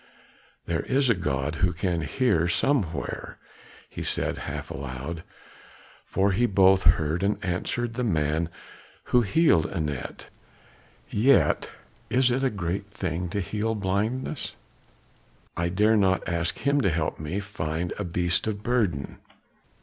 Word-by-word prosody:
"There 85 -1 -1
is 130 +5 +2
a - - +6
God 75 -5 -2
who 90 0 +2
can 85 0 -1
hear 85 - +1
somewhere," 85 - -1 0.5
he - - -8
said - - -1
half - - -5
aloud. 70 +5 -5 0.9
"For 100 +1 +2
he 120 +6 +2
both 95 -1 +5 0.2
heard 80 +2 -1
and 100 +2 +1
answered 115 +6 -1
the 125 +2 -2
man 80 -5 +1 0.6
who 125 - +7
healed 115 - +3
Anat; 75 -5 -4 0.8
yet 130 +7 +3 0.4
is 125 0 +3
it 130 +2 0
a 135 - +3
great 95 -1 -3
thing 90 -3 -3
to 100 +3 -1
heal 105 +5 -1
blindness, 105 +8 -2 1.0
I 85 0 0
dare 105 +5 +3
not 95 -2 +2
ask 85 -1 -1
him 140 0 +2
to 95 - +3
help 80 -2 -1
me 80 +6 -3
find 85 -4 -3
a - - -1
beast 85 +1 0
of 105 -1 -3
burden. 105 - 0
95 Hz, 135 wpm, -26 LUFS, 85-110 Hz, 1.0 s, who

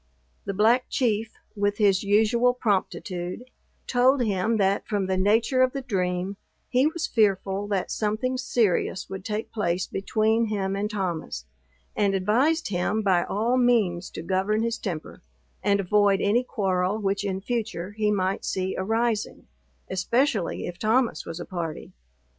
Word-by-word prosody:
The 195 - -2
Black 230 +5 +4
Chief, 225 -3 0 0.2
with 205 0 0
his 200 -3 +3
usual 225 +4 +3
promptitude, 195 0 -2 0.3
told 255 +1 +3
him, 215 +1 +1
that 195 -1 +1
from 205 -2 0
the 190 0 0
nature 220 +7 +2
of 255 0 +3
the 275 - -3
dream, 185 -3 -2 0.3
he 260 +3 +3
was 320 +1 -2
fearful 200 -2 +1
that 200 -3 -1
something 215 +4 -1
serious 215 -7 0
would 190 -1 -6
take 215 +1 -4
place 180 -4 -1
between 220 +3 +1
him 195 -3 -2
and 205 +1 -2
Thomas; 175 - -3 0.5
and 200 -2 +2
advised 250 - +2
him 200 +3 0
by 185 -4 +3
all 230 +5 0
means 215 -8 +2
to - - -6
govern 195 +5 0
his 230 0 -1
temper, 170 -7 -6 0.4
and 200 0 +2
avoid 200 +1 +3
any 215 +6 +2
quarrel 195 -5 0
which 200 -1 -1
in 190 -2 -2
future 210 -4 -3
he 210 0 0
might 195 -2 0
see 190 0 -2
arising, 225 +2 -1 0.4
especially 215 +3 0
if 175 0 -7
Thomas 225 -4 +1
was 165 - -6
a 175 - -5
party. 165 -4 -5
205 Hz, 150 wpm, -25 LUFS, 190-230 Hz, 0.5 s, Black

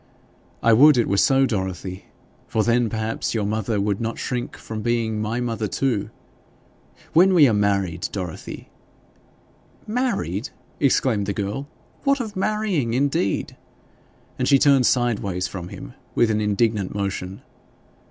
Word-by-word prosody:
'I 115 - +5
would 145 +4 +7
it 120 - +2
were 100 - +1
so, 135 +5 +4
Dorothy! 95 -4 -4 0.4
For 110 - 0
then, 120 0 +2
perhaps, 110 +1 -2
your 105 -2 0
mother 110 0 -1
would 100 +1 -1
not 115 0 -3
shrink 125 -1 -4
from 110 -1 -6
being 115 -1 0
my 110 +3 -2
mother 115 -3 -2
too. 120 -1 -1 1.0
When 185 +3 +5
we 150 -5 +7
are 115 - +2
married, 100 -4 0
Dorothy 90 -5 -6 0.6
' - - -32
'Married!' 210 - -1 0.3
exclaimed 125 -7 +2
the 100 - -1
girl. 105 +8 -4 0.4
'What 275 -1 +2
of 220 -4 -5
marrying, 190 - 0
indeed!' 135 -7 0 0.8
And - - 0
she 140 - +6
turned 135 -3 +4
sideways 100 -7 0
from 90 -1 -7
him - - -9 0.2
with 115 -2 +3
an 110 0 0
indignant 105 -1 0
motion. 100 -1 -4
110 Hz, 140 wpm, -23 LUFS, 100-135 Hz, 1.0 s, would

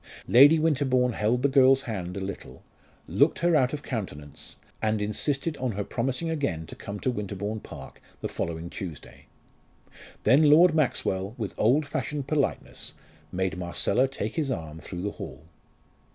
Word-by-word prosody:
Lady 145 +6 +8
Winterbourne 135 -6 +2
held 115 +4 0
the - - +5
girl's 135 0 +5
hand 95 -5 -4
a - - -2
little, 95 0 -7 0.4
looked - - +3
her 170 0 +2
out 130 -3 +3
of 150 -1 -5
countenance, 75 - -6 0.3
and 110 -1 +1
insisted 135 +9 -1
on 125 -3 -2
her 100 +1 -2
promising 130 +9 -2
again 140 - -2
to - - -10
come 100 0 -7
to 130 - 0
Winterbourne 105 -1 -4
Park 70 -8 -11 0.2
the - - -3
following 85 0 -4
Tuesday. 85 -4 -8 1.0
Then 150 +3 +5
Lord 165 +3 +7
Maxwell, 105 -9 0
with 105 -7 -4
old 135 +8 +3
fashioned 145 0 -3
politeness, 145 -2 -2 0.4
made 95 0 -2
Marcella 90 +8 +1
take 135 +5 -5
his 150 -4 0
arm 80 -9 -4
through 90 +2 -7
the 105 - -1
hall. - - -8
120 Hz, 155 wpm, -27 LUFS, 95-140 Hz, 1.0 s, Lady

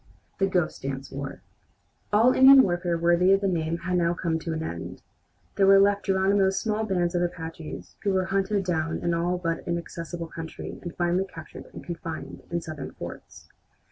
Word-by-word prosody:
THE 195 - +3
"GHOST 180 -3 0
DANCE 135 0 -5
WAR" 140 0 -6 0.7
All 225 +5 +5
Indian 265 0 +9
warfare 175 -2 0
worthy 175 +3 +4
the 195 0 0
name 165 -2 -1
had 180 +1 -1
now 170 0 +1
come 165 -2 -1
to 165 - -4
an 160 0 -2
end. 85 - -6 0.5
There 195 - +4
were 195 0 +8
left 200 +1 +3
Geronimo's 195 0 +2
small 220 +1 -1
bands 180 -4 0
of 175 - +1
Apaches, 165 -2 -5
who 205 - 0
were 190 -1 +1
hunted 195 +1 0
down 165 -2 -1
in - - -9
an 170 0 +1
all 175 +2 0
but 165 -2 -2
inaccessible 170 0 -4
country 165 0 -7
and 175 -2 -7
finally 175 +2 +1
captured 165 -4 -11
and - - -10
confined 165 -2 -6
in 170 0 -2
Southern 155 -4 -7
forts. - - -10
175 Hz, 180 wpm, -26 LUFS, 165-195 Hz, 0.7 s, Indian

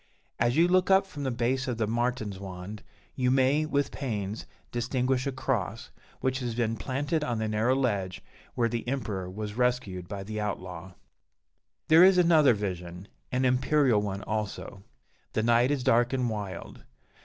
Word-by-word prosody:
As 120 +4 +2
you 170 +2 +6
look 185 +1 +3
up 195 0 +5
from 150 -7 -9
the 135 - -1
base 130 +2 0
of 125 -3 -2
the 110 - +1
Martinswand, 105 -4 -3 0.3
you 125 -1 0
may, 135 +4 +3
with 145 -2 0
pains, 105 -6 -4 0.2
distinguish 125 +2 0
a - - 0
cross, 125 -2 -3 0.3
which 130 0 0
has 120 -3 -3
been 115 -1 0
planted 145 +7 -2
on 120 -5 -1
the 110 0 -1
narrow 110 +4 +2
ledge 100 -9 -1 0.3
where 120 - +2
the 115 +1 -4
Emperor 105 -8 -3
was 105 +2 -5
rescued 120 -7 -1
by 100 0 -5
the 110 +1 -4
outlaw. 95 -3 -5 0.9
There 160 +2 +8
is 190 0 +7
another 160 -8 +5
vision, 90 -2 -5 0.2
an 130 0 +1
imperial 130 -2 +3
one 100 -1 -4
also. 105 -2 -4 0.5
The 110 - 0
night 120 +2 +4
is 140 -3 0
dark 120 +2 +3
and 125 -3 0
wild. 100 -4 -6
120 Hz, 165 wpm, -28 LUFS, 105-130 Hz, 0.9 s, There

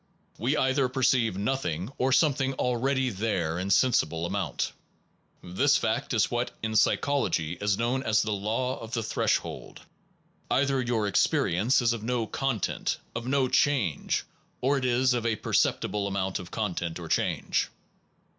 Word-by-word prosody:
We 130 +7 +1
either 130 -1 +2
perceive 125 -6 +2
nothing, 100 - -2
or 130 +1 +2
something 135 -1 +2
already 130 +1 0
there 95 -6 -1
in 95 +2 -3
sensible 85 -7 +2
amount. - - -2 0.7
This 90 +1 +2
fact - - -1
is - - +2
what - - -1
in 110 0 -2
psychology 105 - +1
is 100 -1 +1
known 120 +3 0
as 110 -5 +2
the 110 - -2
law 110 +6 -1
of 115 0 -9
the 115 - -1
threshold. - - -2 0.7
Either 135 -1 +2
your 120 -3 0
experience 105 +4 +2
is 120 0 +3
of 115 - -5
no 120 0 -1
content, 135 -3 -2 0.2
of 115 +1 -4
no 135 0 +2
change, 125 - +1 0.4
or 135 +2 +2
it 130 - -3
is 125 +1 +3
of 120 -2 -1
a 115 -2 +1
perceptible 105 -1 0
amount 95 -1 -2
of 90 -1 -9
content 90 -6 -3
or 85 -2 -7
change. - - 0
115 Hz, 150 wpm, -27 LUFS, 100-130 Hz, 0.7 s, is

